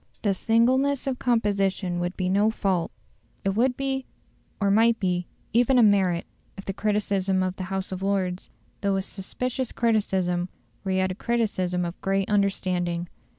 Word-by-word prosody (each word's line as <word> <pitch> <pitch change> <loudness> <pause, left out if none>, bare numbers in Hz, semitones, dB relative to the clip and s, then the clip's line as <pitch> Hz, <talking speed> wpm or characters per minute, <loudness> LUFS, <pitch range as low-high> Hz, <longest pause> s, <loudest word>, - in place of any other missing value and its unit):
This 200 -3 +1
singleness 255 +5 +3
of 265 -2 -2
composition 195 -6 +1
would 175 +1 -3
be 185 - 0
no 200 +3 +3
fault; 190 -6 0 0.6
it - - +3
would 245 +6 +1
be, 270 -1 -2 0.5
or 200 -1 +2
might 225 +2 +4
be, 180 -2 0 0.3
even 245 +3 +4
a 240 - +7
merit, 190 -5 +3 0.3
if 195 - -8
the 195 - -3
criticism 200 -2 0
of 185 0 -2
the 185 - -5
House 190 0 -3
of 185 0 -4
Lords, 190 -2 -1 0.3
though 200 -1 +1
a 190 - 0
suspicious 250 +6 -3
criticism, 190 -6 +1 0.3
were 195 - -3
yet 185 0 +1
a - - -2
criticism 185 -5 0
of 170 +1 -6
great 195 0 0
understanding. 180 -4 0
195 Hz, 160 wpm, -25 LUFS, 185-225 Hz, 0.6 s, a